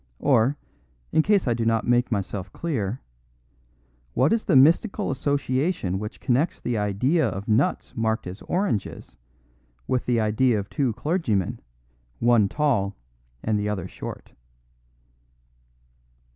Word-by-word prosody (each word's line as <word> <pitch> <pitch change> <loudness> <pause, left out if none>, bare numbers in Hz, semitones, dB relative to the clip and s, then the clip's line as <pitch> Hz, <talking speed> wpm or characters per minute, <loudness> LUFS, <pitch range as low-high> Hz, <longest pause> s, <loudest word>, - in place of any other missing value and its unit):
Or, 135 0 +2 0.5
in 160 - +4
case 200 -2 +2
I 120 - +3
do 115 0 -2
not 115 -1 +1
make 120 +1 +2
myself 100 -2 -3
clear, 125 - -3 1.1
what 135 - +3
is 230 - 0
the 185 - +2
mystical 170 - +4
association 135 - -1
which 105 +1 -6
connects 135 +6 0
the 120 - -2
idea 110 - +1
of 100 +2 -6
nuts 115 +3 +1
marked 110 -1 -1
as 90 +3 -8
oranges 180 - -2 0.7
with 125 - -1
the 120 -2 +2
idea 110 +2 +2
of 100 -1 -5
two 130 -5 0
clergymen, 115 - -1 0.6
one 115 -4 +3
tall 115 -10 0 0.5
and 110 -1 +1
the 105 0 -1
other 95 -4 -3
short?" - - -8
120 Hz, 130 wpm, -24 LUFS, 105-145 Hz, 1.1 s, in